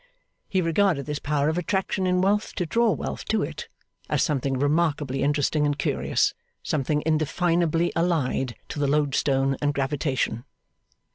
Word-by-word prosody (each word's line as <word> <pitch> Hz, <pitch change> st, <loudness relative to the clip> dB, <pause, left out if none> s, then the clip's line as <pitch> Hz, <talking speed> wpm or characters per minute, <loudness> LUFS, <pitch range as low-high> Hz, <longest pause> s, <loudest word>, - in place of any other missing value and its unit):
He 185 Hz, -1 st, +1 dB
regarded 165 Hz, -3 st, +2 dB
this 150 Hz, -1 st, -3 dB
power 145 Hz, 0 st, 0 dB
of 160 Hz, +3 st, +1 dB
attraction 190 Hz, +1 st, -1 dB
in 180 Hz, 0 st, +2 dB
wealth 205 Hz, +3 st, +1 dB
to 180 Hz, -, -1 dB
draw 230 Hz, +8 st, +2 dB
wealth 95 Hz, -, -3 dB
to -, -, +1 dB
it, -, -, -6 dB, 0.4 s
as -, -, +2 dB
something 135 Hz, -2 st, 0 dB
remarkably 145 Hz, -1 st, 0 dB
interesting 145 Hz, +1 st, +1 dB
and 145 Hz, -1 st, +1 dB
curious -, -, +1 dB, 0.3 s
something 150 Hz, 0 st, 0 dB
indefinably 165 Hz, +2 st, +1 dB
allied 145 Hz, -7 st, 0 dB
to -, -, -5 dB
the 145 Hz, -, +1 dB
loadstone 135 Hz, -2 st, +1 dB
and 145 Hz, -1 st, 0 dB
gravitation. 135 Hz, -4 st, -1 dB
150 Hz, 145 wpm, -25 LUFS, 140-170 Hz, 0.4 s, regarded